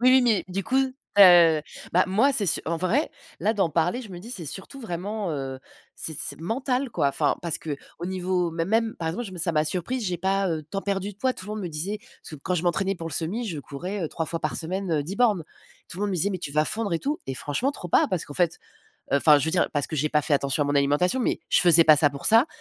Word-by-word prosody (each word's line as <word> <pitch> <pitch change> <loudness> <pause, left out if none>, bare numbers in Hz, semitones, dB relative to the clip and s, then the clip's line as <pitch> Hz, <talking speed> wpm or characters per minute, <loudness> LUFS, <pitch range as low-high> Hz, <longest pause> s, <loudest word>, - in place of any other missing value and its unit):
Oui, 255 +1 +5
oui 260 -1 +6
mais, 225 -5 +2
du 195 +1 -3
coup, 260 - 0
tu 260 -6 +2
as 170 -4 +7 0.3
bah 180 +2 +4
moi, 230 +9 +3
c'est 205 -6 +1
su - - +2
en 170 +1 0
vrai, 185 - 0 0.3
là 215 - +2
d'en 195 -6 +1
parler, 175 - 0
je 215 - -11
me 175 - -8
dis 215 +7 -10
c'est 190 -10 -6
surtout 195 - -8
vraiment, 205 -1 -4
heu, 135 -2 -4 0.4
c'est 160 - -4
c'est - - -2
mental, 250 +7 -1
quoi. 150 -9 +1
Enfin, 145 +1 0
parce 170 -3 0
qu'au 155 +3 -7
niveau 185 -1 -1
mê 165 0 -2
même, 225 +2 +1
par 165 -1 -2
exemple, 235 +9 -3
je 190 - -8
me 180 - -8
ça 170 +1 +1
m'a 155 -1 +2
surprise, 190 +10 -2
j'ai 180 -3 -2
pas, 195 +2 +1
heu, 155 -2 -2
tant 195 - -3
perdu 200 0 -2
de - - -23
poids. 255 +4 0
Tout 185 - -10
le 210 - -5
monde 215 -2 -4
me 180 - -3
disait 185 +8 -3 0.2
ce 155 - -9
quand 180 +6 -3
je 175 - -1
m'entraînais 190 +3 0
pour 165 -2 -6
le - - -8
semi, 205 +10 -2
je 160 -5 -4
courais, 180 +9 -5
heu, 155 - -3
3 160 - -4
fois 165 +2 -4
par - - -2
semaine, 185 +2 -3
heu, 150 -2 +1
10 180 +7 -6
bornes. 220 -8 +3 0.5
Tout 175 - -9
le - - -2
monde 205 - 0
me 185 - -1
disait: 190 +4 +1
«Mais 185 - -3
tu 155 - -5
vas 155 +1 +3
fondre 215 +2 -2
et 165 - +1
tout», 290 - -2
et 135 - -3
franchement 145 - -1
trop 175 - -8
pas, - - +4
parce 185 -4 -1
qu'en 145 - -9
fait, 175 -2 +1 0.5
heu - - +5
enfin, 150 +1 +6
je 145 - -1
veux 160 - 0
dire, 175 +1 +2
parce 145 -2 0
que 155 - -5
j'ai 150 +2 +1
pas 150 -1 +1
fait 145 - -3
attention 140 +1 +1
à - - -1
mon 145 - 0
alimentation. 145 - +2
Mais - - 0
je - - +5
faisais 170 -2 +7
pas 155 -1 +7
ça 145 0 +4
pour 140 0 -10
ça, 230 +6 +6
180 Hz, 285 wpm, -25 LUFS, 160-205 Hz, 0.5 s, as